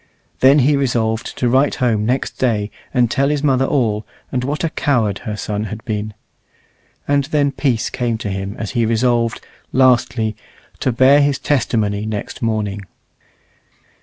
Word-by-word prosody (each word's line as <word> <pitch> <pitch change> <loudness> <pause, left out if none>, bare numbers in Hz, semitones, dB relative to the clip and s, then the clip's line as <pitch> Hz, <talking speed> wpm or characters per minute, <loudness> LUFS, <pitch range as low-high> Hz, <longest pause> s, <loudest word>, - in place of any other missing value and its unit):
Then 135 +2 +6
he 145 +1 +4
resolved 115 -5 -1
to 125 - +1
write 135 +4 +3
home 110 -4 0
next 130 +2 -2
day 105 -5 0 0.2
and 125 -2 +3
tell 140 0 +2
his 150 -1 -1
mother 135 -2 +3
all, 110 -7 0 0.3
and 125 -1 -1
what 145 +5 -2
a 165 - 0
coward 110 -8 0
her 105 - -4
son 105 0 -3
had 110 +2 -7
been. 105 -2 -3 0.9
And 140 -1 +2
then 145 -1 +1
peace 130 -6 -1
came 120 -3 -1
to 110 -2 -4
him 95 +1 -4
as 105 -4 -4
he 115 - +1
resolved, 115 +1 +1 0.3
lastly, 120 -4 +2 0.4
to 130 - 0
bear 130 +4 +5
his 140 -1 +2
testimony 110 -6 0
next 110 +4 -5
morning. 105 -3 -1
120 Hz, 160 wpm, -18 LUFS, 110-135 Hz, 0.9 s, Then